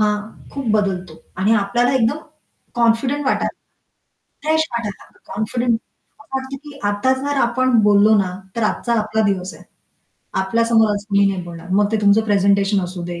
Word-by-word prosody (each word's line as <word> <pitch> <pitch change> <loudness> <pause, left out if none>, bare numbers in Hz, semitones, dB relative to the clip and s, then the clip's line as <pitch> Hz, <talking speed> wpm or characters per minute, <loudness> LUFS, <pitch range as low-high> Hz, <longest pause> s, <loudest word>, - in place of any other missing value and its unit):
हां, 210 0 +2 0.4
खूप 275 -2 -4
बदलतो 185 -6 -1 0.2
आणि 200 +4 +2
आपल्याला 240 +5 +1
एकदम 245 +3 +2 0.6
कॉन्फिडंट 240 +5 +1
वाटायचं. - - 0 0.9
फ्रेश 315 +1 +2
वाटायला 230 -4 -4
लागतं - - -16
कॉन्फिडंट 235 +3 0 0.5
असं 270 - -12
वाटतं 265 +1 -5
की 290 -2 -11
आता 205 +6 +1
जर 285 0 -1
आपण 250 0 +2
बोललो 210 +1 +5
ना, 185 -2 0 0.2
तर 230 - -1
आजचा 235 +2 0
आपला 215 +1 0
दिवस 185 -2 -2
आहे. - - -15 0.8
आपल्या 225 +5 +1
समोर 225 -2 +3
कोणी 200 -1 +3
नाही 185 -2 -4
बोलणार. 170 0 -10
मग 205 +1 +2
ते - - +3
तुमचं 205 +1 +4
प्रेझेंटेशन 200 -1 +2
असू 180 0 -6
दे 175 0 -6
215 Hz, 165 wpm, -19 LUFS, 200-240 Hz, 0.9 s, बोललो